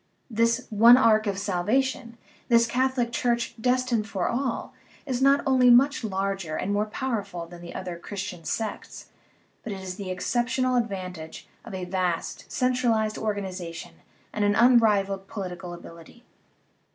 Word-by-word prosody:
This 230 +2 +1
"one 230 +4 +8
ark 220 -3 +4
of 200 -1 -1
salvation," 230 +6 -1 0.3
this 235 -1 +5
Catholic 255 0 0
Church 235 0 0
" - - -13
destined 250 -3 +1
for 190 -3 -1
all," 250 0 -2 0.3
is 260 -3 -2
not 275 +1 +4
only 260 -2 +4
much 265 +3 +5
larger 195 -5 -2
and 200 +5 -2
more 210 +1 0
powerful 210 -8 -4
than 170 +1 -12
the 170 - -9
other 180 -2 -5
Christian 195 -2 -6
sects, 220 +6 -5 0.5
but 225 - -6
it 195 - -5
has 185 -1 -7
the 195 -2 -6
exceptional 245 +7 0
advantage 185 -8 -4 0.2
of - - -8
a 185 -1 -4
vast, 180 -2 -3
centralized 240 -4 +1
organiza 190 -5 -3
tion - - -8 0.4
and 210 - -1
an 205 0 +3
unrivalled 210 -5 +3
political 180 -3 -6
ability. 170 +7 -12
215 Hz, 150 wpm, -26 LUFS, 190-245 Hz, 0.5 s, one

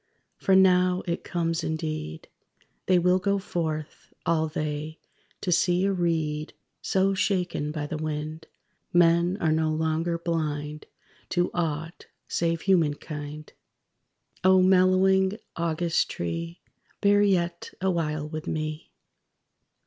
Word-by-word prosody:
For 190 - +3
now 185 -1 +4
it 170 0 -2
comes 165 -2 -1
indeed, 155 - -4 0.6
They 185 - +5
will 180 +1 +3
go 200 +2 +1
forth, 160 -5 -4
all 160 -1 +2
they, 155 0 -4 0.4
to 180 - -1
see 180 +2 +3
a 200 - +2
reed 160 -4 -1 0.3
So 195 +1 +2
shaken 180 -6 0
by 150 -1 -3
the 155 +1 -4
wind. 155 +1 -4 0.4
Men 175 +1 +4
are 160 - +1
no 160 0 +2
longer 160 +2 0
blind 150 -3 -3 0.4
To 175 -1 +1
aught, 165 0 -3 0.2
save 165 -1 0
human 170 -7 +3
kind. 150 0 -8 0.9
(_O 185 0 +6
mellowing 190 +1 +4 0.2
August 170 0 0
tree, 85 0 -4 0.4
Bear 205 0 +4
yet 175 -4 +1
awhile 160 -5 -1
with 155 0 -6
me. 155 0 -3
165 Hz, 120 wpm, -26 LUFS, 155-180 Hz, 0.9 s, O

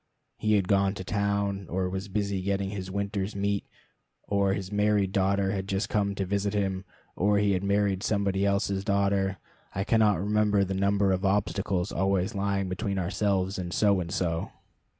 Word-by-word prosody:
He 110 0 +2
had 100 -3 +2
gone 100 0 +2
to 95 - -6
town; 100 -1 -1
or 90 +1 -1
was 95 +2 -4
busy 100 -1 -1
getting 100 0 -1
his 95 -2 -5
winter's 100 +1 -2
meat; 100 0 -1 0.6
or 100 -1 +1
his 95 -1 -5
married 105 -2 +2
daughter 95 0 +1
had 95 -1 -3
just 100 +2 -1
come 100 -2 0
to 95 - -2
visit 100 +2 -1
him, 95 -2 -1 0.3
or 100 +2 +2
he 100 0 +3
had 95 0 0
married 100 -1 +1
somebody 100 -2 0
else's 100 -1 +1
daughter. 100 -1 +1 0.4
I 95 - 0
cannot 105 -4 +3
remember 105 0 +2
the 95 0 -2
number 100 0 +2
of 95 0 0
obstacles 95 -1 0
always 95 +2 0
lying 100 -1 -1
between 100 +2 -2
ourselves 95 +1 0
and 90 -1 -4
So 100 +2 +3
and 85 -2 -4
So. 85 -3 -1
100 Hz, 175 wpm, -28 LUFS, 95-100 Hz, 0.6 s, he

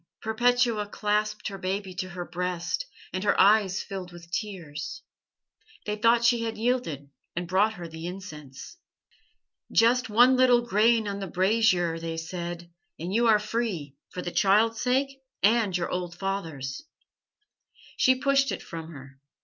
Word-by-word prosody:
"Perpetua 235 -1 +2
clasped 210 +1 -1
her 195 -1 -8
baby 190 0 -3
to 185 +1 -4
her 175 -1 -6
breast, 180 - -3 0.3
and 185 - -2
her 205 - +2
eyes 200 -1 +4
filled 190 -3 -7
with 170 -1 -13
tears. 190 - -5 0.8
They 210 - -1
thought 230 +2 +3
she 235 -1 +4
had 225 -1 -3
yielded, 215 - -1 0.2
and 175 0 -3
brought 200 +5 +2
her 175 -3 -7
the 160 +1 -7
incense. 160 - -9 0.9
"'Just 245 +2 +3
one 245 +5 +6
little 250 -1 +5
grain 225 0 +3
on 200 0 -3
the 195 - -4
brazier,' 185 -3 +2
they 165 0 -4
said, 170 +1 -6 0.3
'and 175 +4 -5
you 235 +2 +3
are 220 -2 +6
free 210 - -3
for 180 - -6
the 175 - -4
child's 215 +4 +3
sake 270 +2 0 0.2
and 210 -3 +3
your 170 - -3
old 175 -1 -4
father's.' 165 -9 -4 1.1
"She 260 - +4
pushed 275 +1 +2
it - - -5
from 165 -1 -7
her. 135 -1 -12
200 Hz, 150 wpm, -27 LUFS, 175-230 Hz, 1.1 s, one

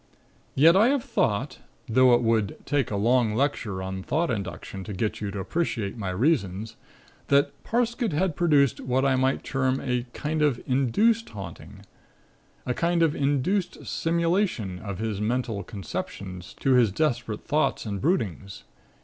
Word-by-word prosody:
Yet 165 +5 +6
I 210 +4 +6
have 275 -2 +1
thought, 120 +5 -1 0.3
though 125 +1 +5
it 120 - 0
would 110 -3 +1
take 145 -4 0
a 105 - -2
long 115 +1 +2
lecture 115 -8 -1
on 95 0 -4
Thought 155 - 0
Induction 95 -2 -5
to 105 - -6
get 110 +3 -2
you 105 - -2
to 100 - -6
appreciate 110 - -2
my 100 -5 -4
reasons, 105 - 0 0.5
that 140 0 +3
Parsket 235 -1 0
had 160 +2 0
produced 145 -6 +3
what 130 +1 0
I 135 -1 +3
might 130 +1 +1
term 130 0 0
a 125 -1 -2
kind 155 +3 -2
of 145 -5 +2
'induced 205 - +2
haunting,' 100 -3 -10 0.8
a 125 - 0
kind 170 +4 +1
of 160 -2 +2
induced 145 +7 0
simulation 165 - 0
of 100 -2 -6
his 110 -1 -3
mental 115 -1 -1
conceptions 95 -2 -6
to 135 - +2
his 120 -5 +4
desperate 120 -3 -1
thoughts 150 -4 0
and 100 -3 -4
broodings. 100 - -1
125 Hz, 155 wpm, -26 LUFS, 105-155 Hz, 0.8 s, Yet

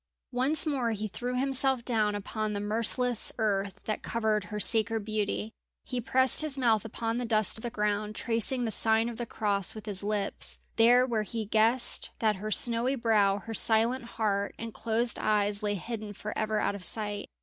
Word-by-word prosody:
Once 265 +6 +3
more 260 -7 -1
he 215 0 -3
threw 245 +5 -5
himself 265 -2 0
down 215 -4 0
upon 215 +1 -4
the 205 - -3
merciless 230 +3 +2
earth 200 -3 -1
that 215 - -3
covered 220 -3 -1
her 210 0 -6
sacred 225 0 +2
beauty. 215 0 -2 0.3
He 250 -2 -4
pressed 260 +3 +3
his 305 -3 +1
mouth 230 -5 +2
upon 225 +1 -3
the - - -3
dust 220 -1 +1
of - - -11
the 240 - -4
ground, 210 -1 -2
tracing 240 +2 0
the 225 - -2
sign 225 +1 +2
of 235 - -8
the 240 0 -5
Cross 200 -4 0
with 215 - -9
his 200 -3 0
lips, 205 -1 -2 0.2
there 245 +2 +5
where 230 -4 -1
he 220 +1 -4
guessed 225 +4 +2
that 215 -3 +1
her 210 +3 -5
snowy 235 +4 +2
brow, 215 -5 +2
her 225 - -6
silent 230 +3 +4
heart, 205 -3 -2
and 230 -1 -7
closed 230 +2 -1
eyes 205 -1 +1
lay 205 -1 -1
hidden 215 +1 -6
for 210 +1 -7
ever 215 -1 -1
out - - 0
of 200 -2 -8
sight. 205 0 -3
220 Hz, 190 wpm, -28 LUFS, 210-235 Hz, 0.3 s, there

